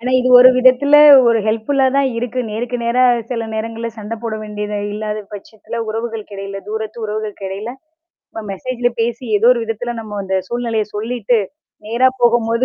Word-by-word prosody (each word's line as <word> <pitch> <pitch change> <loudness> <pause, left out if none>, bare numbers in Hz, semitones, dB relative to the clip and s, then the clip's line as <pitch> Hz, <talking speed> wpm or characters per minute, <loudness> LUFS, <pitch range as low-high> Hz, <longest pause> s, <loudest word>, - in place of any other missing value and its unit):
ஆனா, 250 +2 -3
இது 255 - 0
ஒரு 255 - +9
விதத்துல 255 +3 +5 0.3
ஒரு 230 -1 +3
ஹெல்ப்ஃபுல்லா 230 +5 +1
தான் 275 -1 +2
இருக்கு. 245 +1 -3
நேருக்கு 240 +3 -3
நேரா 240 +2 +2 0.3
சில 230 -2 -3
நேரங்கள்ல 225 +1 -4
சண்ட 215 +1 -5
போட 230 -2 -3
வேண்டியதா 210 0 -5 0.2
இல்லாத 215 0 -4
பட்சத்தில 220 +3 -8
உறவுகளுக்கு 225 -1 -5
எடையில 195 0 -6
தூரத்து 220 +1 -5
உறவுகளுக்கெடைல 210 0 -5 0.4
நம்ம 225 - -11
மெசேஜ்ல 245 +4 -2
பேசி 235 +2 -2
ஏதோ 230 +4 +4
ஒரு 240 -2 -2
விதத்தில 225 +2 -4
நம்ம 210 -2 -7
அந்த 190 0 -1
சூழ்நிலைய 230 -3 -2
சொல்லிட்டு, 230 +1 0 0.5
நேரா 240 +4 +2
போகும்போது 235 0 +2
225 Hz, 155 wpm, -17 LUFS, 215-245 Hz, 0.5 s, ஒரு